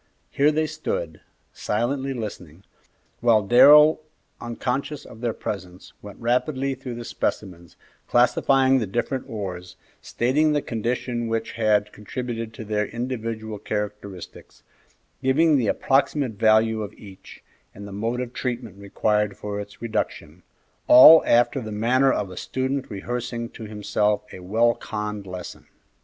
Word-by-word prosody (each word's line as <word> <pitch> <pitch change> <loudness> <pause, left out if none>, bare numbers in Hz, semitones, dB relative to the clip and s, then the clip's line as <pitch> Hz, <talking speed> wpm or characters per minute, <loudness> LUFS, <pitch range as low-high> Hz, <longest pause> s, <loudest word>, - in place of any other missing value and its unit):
Here 145 +2 +3
they 155 +1 0
stood, 155 - -4 0.3
silently 130 +6 -2
listening, 100 - -7 0.6
while 115 -4 +3
Darrell, 150 +8 +7 0.4
unconscious 135 +5 -4
of 115 - -13
their 120 -2 0
presence, 95 -4 -7
went 100 -1 -11
rapidly 130 +3 0
through 130 -2 -7
the 120 0 -7
specimens, 85 -8 -4 0.3
classifying 130 +2 +3
the 110 - -2
different 125 +6 -3
ores, 90 -5 -6 0.3
stating 150 +6 +1
the 145 - +1
conditions 120 +1 -3
which 115 0 -2
had 105 -2 +1
contributed 115 +1 -5
to 120 - -7
their 105 -1 -1
individual 115 -3 -5
characteristics, 105 -3 -6 0.6
giving 150 +4 +3
the 125 -6 +1
approximate 135 +2 +1
value 110 +1 +3
of 105 - -6
each 95 -3 -14 0.3
and 100 +1 -9
the - - -10
mode 115 +5 -2
of 125 -1 -6
treatment 120 -6 -5
required 105 +1 -1
for 105 -1 -5
its 100 +2 -10
reduction; 90 -7 -4 0.5
all 155 +6 +10
after 120 +2 +3
the 110 -2 -7
manner 125 +6 +2
of 100 -3 -2
a 90 - -10
student 130 +1 -3
rehearsing 115 +2 -4
to 115 - -10
himself 105 0 -1
a - - -9
well 110 +6 +2
conned 105 -2 -6
lesson. 90 -1 -8
115 Hz, 135 wpm, -23 LUFS, 105-130 Hz, 0.6 s, all